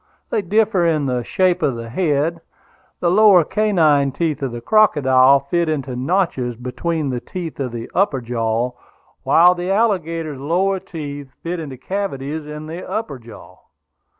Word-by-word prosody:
They 220 - +1
differ 200 -2 +2
in 155 -3 +1
the 125 -2 -1
shape 185 +6 +1
of 135 - +1
the 115 0 -7
head; 160 +3 0 0.6
the 170 - +2
lower 200 -3 +6
canine 155 -9 +2
teeth 155 +1 -2
of 135 -3 -2
the 120 - -6
crocodile 135 - +4
fit 170 +4 -1
into 135 -4 -3
notches 130 -4 -1
between 135 +5 -3
the 125 - -2
teeth 170 +3 -7
of 130 -3 -2
the 115 -1 -6
upper 185 -9 +1
jaw, 115 0 -1 0.5
while 175 +2 +5
the 180 +1 -4
alligator's 165 - 0
lower 185 +7 0
teeth 145 -5 -7
fit 175 +1 -3
into 140 -5 -7
cavities 155 -3 -4
in 150 0 -7
the 165 +4 -7
upper 185 - -4
jaw. 115 0 -14
155 Hz, 155 wpm, -20 LUFS, 130-180 Hz, 0.6 s, lower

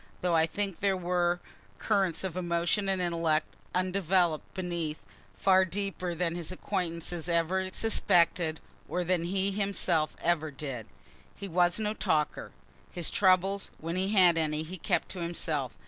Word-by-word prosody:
(Though 180 -1 +1
I 160 0 +4
think 195 0 -3
there 195 -1 +2
were 175 -1 0 0.4
currents 185 -4 +1
of 185 -3 -3
emotion 175 +3 0
and 190 -1 +1
intellect 165 -3 +1 0.3
undevelop'd 185 -3 +1
beneath, 170 -4 -3 0.3
far 190 -1 +5
deeper 185 -2 -3
than 170 0 0
his 170 0 -4
acquaintances 175 -3 -3
ever 175 +3 +1
suspected 170 -6 +2 0.3
or 180 - -1
than 175 -1 0
he 195 +2 0
himself 190 -5 0
ever 165 -2 +1
did.) 135 -5 -6 0.5
He 200 - -7
was 175 0 +2
no 215 -1 -1
talker. 155 -7 -1 0.4
His 175 -3 -3
troubles, 195 +1 +3
when 165 +2 -4
he 190 +1 0
had 180 -5 +5
any, 155 -1 -1
he 180 +3 -7
kept - - 0
to 185 - -6
himself. 160 -6 -2
175 Hz, 145 wpm, -30 LUFS, 165-190 Hz, 0.5 s, far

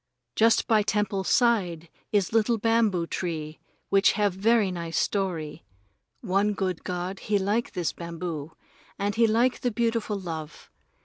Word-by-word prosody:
Just 225 +1 +3
by 220 -2 +4
temple's 205 -2 -1
side 185 -9 +2 0.2
is 205 -1 +1
little 225 +1 +3
bamboo 220 -5 +2
tree 160 -3 -4 0.3
which 195 0 +4
have 205 -3 +1
very 210 +1 +2
nice 170 -2 -4
story. 175 -7 -2 0.6
One 205 0 +1
good 185 -4 -2
god 180 +1 -4
he 210 -1 0
like 205 +4 -1
this 175 -4 -1
bamboo, 170 -3 -6 0.4
and 205 0 -1
he 230 +1 +3
like 235 +4 +2
the 245 - +1
beautiful 230 -2 -1
love. 160 -4 -7
195 Hz, 140 wpm, -26 LUFS, 175-220 Hz, 0.6 s, by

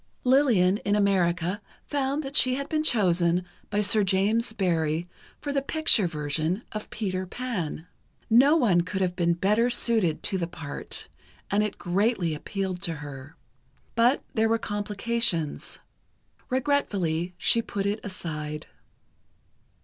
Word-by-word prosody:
Lillian 245 -8 +4
in 205 -1 -1
America 185 -1 +1 0.2
found 285 +1 -1
that 270 +1 -7
she 255 -2 +6
had 280 +1 -4
been 310 0 0
chosen 180 - +2 0.2
by 210 0 0
Sir 210 +1 +3
James 205 +5 +1
Barrie 170 -5 0 0.3
for 285 -1 -4
the 275 - +1
picture 275 - +3
version 155 - -2
of 215 -1 -6
"Peter 185 -3 -3
Pan." 185 -9 -4 0.4
No 265 +7 +5
one 200 - +3
could 190 +2 -4
have 180 -1 0
been 170 -1 +1
better 210 +7 +2
suited 225 -9 +2
to 190 - +1
the 170 - -2
part, 160 -4 -4 0.4
and 205 +1 +3
it 210 -1 -2
greatly 185 -2 0
appealed 190 +3 -4
to 170 -4 -2
her. 145 0 -9 0.6
But 240 +4 +3
there 225 -3 +2
were 230 - +3
complications. 205 -6 -1 0.7
Regretfully 195 - 0
she 230 - +3
put 200 -3 -4
it 205 +2 -1
aside. 155 -5 -5
200 Hz, 135 wpm, -26 LUFS, 175-230 Hz, 0.7 s, she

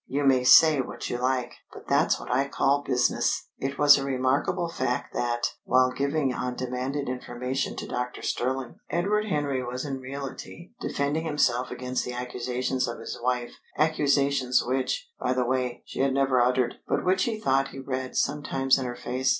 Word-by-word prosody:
You 145 +2 -1
may 130 -2 +4
say 150 +2 +7
what - - -6
you 120 - -2
like, 130 0 0 0.2
but - - -12
that's - - +3
what - - -7
I 135 +3 +2
call 140 +1 +2
business!" 125 -3 0
It 135 +1 -3
was 145 -1 +7
a - - -3
remarkable 135 +6 0
fact 125 -6 -2
that, 120 -1 -1
while 130 0 +3
giving 140 0 0
undemanded 125 +3 -3
information 125 +1 -3
to - - -6
Doctor 125 0 -4
Stirling, 130 0 -2
Edward 200 +6 +1
Henry 145 -7 -1
was 125 +3 -4
in 135 -2 -4
reality 140 +6 -8
defending 145 +3 -1
himself 130 -5 +1
against 125 0 -3
the 125 - -5
accusations 125 +1 -2
of 120 - -4
his - - -7
wife 125 0 -1 0.3
accusations 140 -4 +2
which, 130 - -1
by 125 - 0
the 125 -1 0
way, 125 -1 -1
she - - -8
had 135 0 +2
never 135 -2 +3
uttered, 125 0 +1
but - - 0
which 185 +1 +3
he 225 -2 -2
thought 135 -8 +2
he - - -11
read 130 -1 -4
sometimes 135 -2 +1
in 130 - -3
her 120 - -5
face. 125 +2 -1
130 Hz, 175 wpm, -26 LUFS, 125-140 Hz, 0.3 s, say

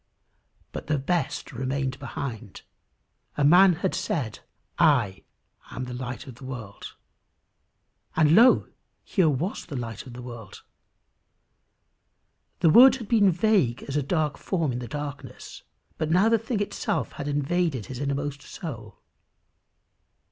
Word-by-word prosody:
But - - -7
the 150 0 +1
best 145 0 -2
remained 130 +1 -3
behind. 120 -6 -6 0.7
A 145 - +1
man 180 +5 +7
had 180 +3 -2
said, 120 -9 -2 0.4
"I 125 - +3 0.5
am 130 - -5
the 125 0 -6
light 125 -1 -6
of 130 - -9
the 125 - -15
world," 120 -6 -8 1.2
and 155 -1 +4
lo! 235 +7 +6 0.4
here 185 -6 +2
was 150 +8 -3
the 150 - -7
light 120 0 -6
of 125 - -10
the 125 0 -9
world. 120 -5 -10 2.0
The 165 -3 +5
words 255 +6 +8
had 230 -5 -9
been 210 -4 +5
vague 180 - +1
as 140 - -6
a 150 - +2
dark 150 +1 -1
form 165 -7 -1
in 120 - -3
darkness, 145 +3 -7 0.4
but 155 -1 -1
now 185 +7 +4
the 230 -1 +3
thing 225 -1 -2
itself 205 - -2
had 145 - -6
invaded 145 - 0
his 130 -2 -7
innermost 140 0 -3
soul. 115 - -9
145 Hz, 135 wpm, -26 LUFS, 125-175 Hz, 2.0 s, words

